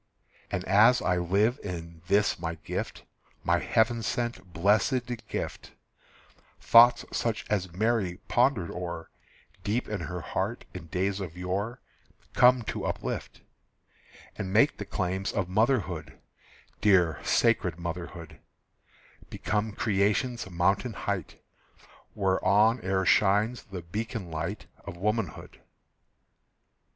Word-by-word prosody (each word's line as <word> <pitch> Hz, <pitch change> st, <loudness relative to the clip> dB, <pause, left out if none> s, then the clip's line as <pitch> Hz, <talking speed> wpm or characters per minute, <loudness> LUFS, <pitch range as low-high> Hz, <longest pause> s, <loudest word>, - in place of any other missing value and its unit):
And 90 Hz, +1 st, -3 dB
as 110 Hz, +5 st, +6 dB
I 90 Hz, -, +1 dB
live 100 Hz, +9 st, +1 dB
in 85 Hz, -3 st, -7 dB
this 100 Hz, 0 st, +2 dB
my 85 Hz, -1 st, -3 dB
gift, 80 Hz, 0 st, -5 dB, 0.4 s
My -, -, +2 dB
heaven 115 Hz, +1 st, +2 dB
sent, 120 Hz, -4 st, -3 dB
blessed 110 Hz, -, +2 dB
gift, -, -, -5 dB, 0.9 s
Thoughts 120 Hz, +1 st, +6 dB
such 115 Hz, -2 st, -1 dB
as 95 Hz, -4 st, 0 dB
Mary 100 Hz, -1 st, 0 dB
pondered 120 Hz, -8 st, +2 dB
o'er 85 Hz, -2 st, -6 dB, 0.5 s
Deep 110 Hz, +5 st, -1 dB
in 105 Hz, -2 st, -3 dB
her 90 Hz, -1 st, -5 dB
heart -, -, -3 dB
in 85 Hz, -, -8 dB
days 95 Hz, +4 st, -1 dB
of 90 Hz, -3 st, -6 dB
yore 100 Hz, +6 st, -3 dB, 0.5 s
Come 125 Hz, 0 st, +5 dB
to -, -, -4 dB
uplift, -, -, -4 dB, 0.9 s
And 95 Hz, -, -4 dB
make 115 Hz, +8 st, +4 dB
the 105 Hz, -, -4 dB
claims 95 Hz, 0 st, -2 dB
of 105 Hz, -3 st, -1 dB
motherhood, 95 Hz, -, 0 dB, 0.6 s
Dear 90 Hz, -7 st, +4 dB
sacred 105 Hz, -8 st, +2 dB
motherhood, 85 Hz, -1 st, -7 dB, 0.9 s
Become 105 Hz, +1 st, -2 dB
creation's 105 Hz, +2 st, 0 dB
mountain 95 Hz, +7 st, +1 dB
height, 100 Hz, -5 st, -4 dB, 0.8 s
Whereon 100 Hz, +4 st, +3 dB
e'er 95 Hz, 0 st, 0 dB
shines 105 Hz, +6 st, +3 dB
the 95 Hz, -6 st, -7 dB
beacon 105 Hz, +1 st, -5 dB
light 80 Hz, +1 st, -4 dB, 0.2 s
Of 85 Hz, -, -8 dB
womanhood. 105 Hz, -1 st, -3 dB
100 Hz, 115 wpm, -28 LUFS, 90-110 Hz, 0.9 s, as